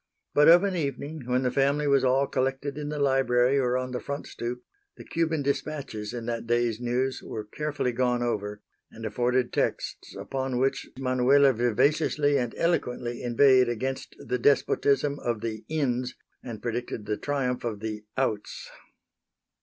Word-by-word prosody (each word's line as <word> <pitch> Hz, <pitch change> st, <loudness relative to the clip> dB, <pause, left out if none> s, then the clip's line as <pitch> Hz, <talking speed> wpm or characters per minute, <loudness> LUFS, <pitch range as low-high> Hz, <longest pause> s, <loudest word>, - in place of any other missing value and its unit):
But 150 Hz, 0 st, +5 dB
of 175 Hz, +3 st, +8 dB
an 195 Hz, -2 st, 0 dB
evening, 140 Hz, -2 st, -4 dB
when 125 Hz, +1 st, +1 dB
the 125 Hz, -, +1 dB
family 140 Hz, +2 st, +2 dB
was 140 Hz, -2 st, +3 dB
all 130 Hz, +2 st, +3 dB
collected 135 Hz, +1 st, -2 dB
in 150 Hz, 0 st, -4 dB
the 150 Hz, -, -3 dB
library 135 Hz, -1 st, +3 dB
or 125 Hz, -1 st, +1 dB
on 130 Hz, 0 st, -3 dB
the 125 Hz, -, -3 dB
front 140 Hz, +1 st, -5 dB
stoop, 120 Hz, +1 st, -5 dB, 0.3 s
the -, -, -10 dB
Cuban 160 Hz, -3 st, -1 dB
dispatches 140 Hz, -6 st, -3 dB
in 120 Hz, -1 st, -5 dB
that 115 Hz, -1 st, -3 dB
day's 120 Hz, -1 st, +1 dB
News 125 Hz, +2 st, -1 dB
were 110 Hz, -1 st, -6 dB
carefully 145 Hz, +2 st, -2 dB
gone 125 Hz, 0 st, +1 dB
over 105 Hz, -3 st, -3 dB, 0.3 s
and 115 Hz, 0 st, -9 dB
afforded 120 Hz, +3 st, 0 dB
texts -, -, -2 dB
upon 135 Hz, -2 st, -3 dB
which 135 Hz, +2 st, 0 dB
Manuela 135 Hz, +1 st, +4 dB
vivaciously 145 Hz, +5 st, +2 dB
and 120 Hz, -2 st, -3 dB
eloquently 125 Hz, -8 st, -1 dB
inveighed 125 Hz, +1 st, +5 dB
against 130 Hz, +3 st, -3 dB
the 125 Hz, -, -3 dB
despotism 140 Hz, +1 st, +2 dB
of 120 Hz, -3 st, -2 dB
the 110 Hz, -1 st, -4 dB
"ins" 130 Hz, -5 st, -1 dB, 0.3 s
and 115 Hz, -4 st, -8 dB
predicted 120 Hz, -2 st, -3 dB
the 105 Hz, -, -1 dB
triumph 135 Hz, -4 st, -2 dB
of 110 Hz, -4 st, -3 dB
the 105 Hz, -1 st, -5 dB
"outs." 110 Hz, -6 st, -2 dB
130 Hz, 160 wpm, -27 LUFS, 120-140 Hz, 0.3 s, of